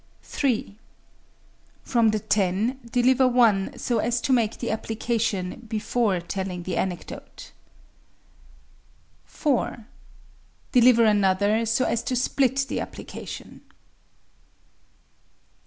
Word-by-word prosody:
3. 225 Hz, -6 st, -2 dB, 1.0 s
From 235 Hz, -3 st, +2 dB
the 215 Hz, -, +1 dB
ten, 210 Hz, +5 st, 0 dB
deliver 255 Hz, +2 st, +4 dB
one 230 Hz, -6 st, +2 dB
so 235 Hz, -3 st, -1 dB
as 240 Hz, +2 st, 0 dB
to 265 Hz, -, 0 dB
make 230 Hz, -3 st, +1 dB
the 240 Hz, -, -3 dB
application 220 Hz, -3 st, -2 dB
before 220 Hz, -3 st, 0 dB
telling 180 Hz, 0 st, -5 dB
the 185 Hz, -, -3 dB
anecdote. 180 Hz, -3 st, -5 dB, 1.7 s
4. 250 Hz, -6 st, -1 dB, 0.9 s
Deliver 240 Hz, -2 st, +6 dB
another 205 Hz, +2 st, +2 dB
so 230 Hz, +3 st, +1 dB
as 235 Hz, -, 0 dB
to 255 Hz, -, -2 dB
split 265 Hz, +1 st, +1 dB
the -, -, -3 dB
application. -, -, -8 dB
225 Hz, 95 wpm, -25 LUFS, 200-245 Hz, 1.7 s, Deliver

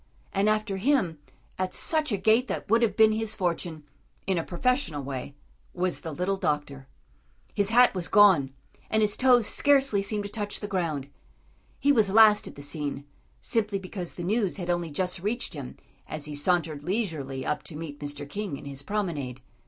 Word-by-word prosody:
And 200 Hz, +2 st, +2 dB
after 215 Hz, -2 st, 0 dB
him, 190 Hz, -, +1 dB, 0.4 s
at 185 Hz, -1 st, -1 dB
such 310 Hz, -4 st, 0 dB
a 205 Hz, -, +1 dB
gait 220 Hz, +6 st, +3 dB
that -, -, -4 dB
would 230 Hz, +1 st, +5 dB
have 230 Hz, -, +2 dB
been 220 Hz, -1 st, +6 dB
his 220 Hz, 0 st, 0 dB
fortune, 170 Hz, -4 st, -2 dB, 0.4 s
in 190 Hz, -3 st, +1 dB
a -, -, -2 dB
professional 180 Hz, -, -1 dB
way, 135 Hz, +1 st, -6 dB, 0.4 s
was 180 Hz, 0 st, 0 dB
the 165 Hz, -, -5 dB
little 180 Hz, +6 st, -1 dB
doctor. 145 Hz, -5 st, -2 dB, 0.7 s
His 200 Hz, 0 st, +2 dB
hat 245 Hz, +2 st, +6 dB
was 180 Hz, -2 st, -2 dB
gone, 190 Hz, -10 st, +5 dB, 0.4 s
and 220 Hz, 0 st, +2 dB
his 210 Hz, -1 st, +3 dB
toes 250 Hz, -3 st, +4 dB
scarcely 275 Hz, -5 st, +3 dB
seemed 205 Hz, +1 st, -2 dB
to 205 Hz, -, -6 dB
touch 205 Hz, -2 st, -3 dB
the 205 Hz, -, -5 dB
ground. 165 Hz, -8 st, -2 dB, 0.7 s
He 285 Hz, -, +4 dB
was 220 Hz, -7 st, +3 dB
last 215 Hz, 0 st, +6 dB
at -, -, -10 dB
the 140 Hz, -, -8 dB
scene, 145 Hz, -1 st, -3 dB, 0.4 s
simply 210 Hz, -3 st, 0 dB
because 185 Hz, -2 st, -6 dB
the 175 Hz, -, -6 dB
news 200 Hz, +1 st, 0 dB
had 175 Hz, -2 st, -2 dB
only 175 Hz, -1 st, -1 dB
just 180 Hz, +4 st, -2 dB
reached 215 Hz, +7 st, -2 dB
him 140 Hz, -5 st, -7 dB, 0.3 s
as 155 Hz, -1 st, -4 dB
he 150 Hz, -, -6 dB
sauntered 155 Hz, -1 st, 0 dB
leisurely 155 Hz, -, -3 dB
up 150 Hz, -, -1 dB
to 160 Hz, -, -7 dB
meet 150 Hz, -3 st, -7 dB
Mr. 145 Hz, -1 st, -5 dB
King 195 Hz, -1 st, -4 dB
in -, -, -12 dB
his 140 Hz, -1 st, -5 dB
promenade. 150 Hz, -9 st, -3 dB
185 Hz, 185 wpm, -27 LUFS, 150-215 Hz, 0.7 s, been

